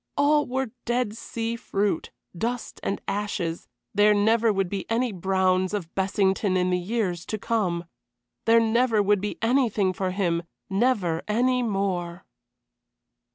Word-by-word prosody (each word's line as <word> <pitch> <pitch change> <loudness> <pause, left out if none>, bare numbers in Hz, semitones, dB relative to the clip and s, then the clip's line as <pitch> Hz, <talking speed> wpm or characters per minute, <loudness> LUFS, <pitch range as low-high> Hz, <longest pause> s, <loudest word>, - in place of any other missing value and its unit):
All 295 +1 +3
were 260 -1 -2
dead 240 -3 0
sea 230 0 -4
fruit, 200 -5 -1 0.3
dust 235 +6 -3
and 195 - -2
ashes; 195 -5 -2 0.3
there 210 +1 +5
never 220 +2 +3
would 195 -2 0
be 195 +1 -5
any 235 +1 +1
Browns 185 0 +1
of 170 -5 -5
Bessington 190 0 +1
in 180 0 +1
the 180 - +2
years 180 -3 -2
to 215 - -2
come. 190 -6 -1 0.6
There 230 0 +6
never 225 -1 +3
would 205 -1 +2
be 210 - -3
anything 225 -6 +2
for 185 0 -2
him, 180 -3 0 0.3
never 195 -6 +1
any 250 +4 +2
more. 190 -5 -2
205 Hz, 140 wpm, -25 LUFS, 185-230 Hz, 0.6 s, There